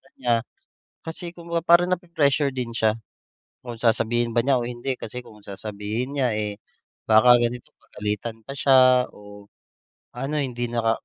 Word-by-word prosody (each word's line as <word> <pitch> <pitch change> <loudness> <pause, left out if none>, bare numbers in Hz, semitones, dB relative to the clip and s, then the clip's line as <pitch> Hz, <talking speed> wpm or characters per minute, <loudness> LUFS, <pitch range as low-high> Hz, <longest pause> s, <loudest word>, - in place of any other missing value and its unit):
kanya. 120 -2 0 0.7
Kasi 170 +1 -7
kung 170 -1 -13
baga 170 0 -1
parang 175 +1 +5
napre-pressure 150 -6 +1
din 125 -2 -3
siya. 110 -1 +3 0.7
Kung 120 -2 -7
sasabihin 120 0 +1
ba 120 - +4
niya 135 -2 +3
o - - -3
hindi 125 +2 -3
kasi 125 +3 -7
kung 105 -2 -15
sasabihin 105 +7 -5
niya, 130 -3 +2
eh, 105 -1 -4 0.5
baka 120 +3 +7
ganito 120 +1 -3
pagalitan 105 +2 -5
pa 135 - -7
siya 130 -2 +5
o 105 0 -14 0.7
ano 135 +5 -4
hindi 120 -3 -3
nakaka 115 -1 0
120 Hz, 150 wpm, -24 LUFS, 110-135 Hz, 0.7 s, baka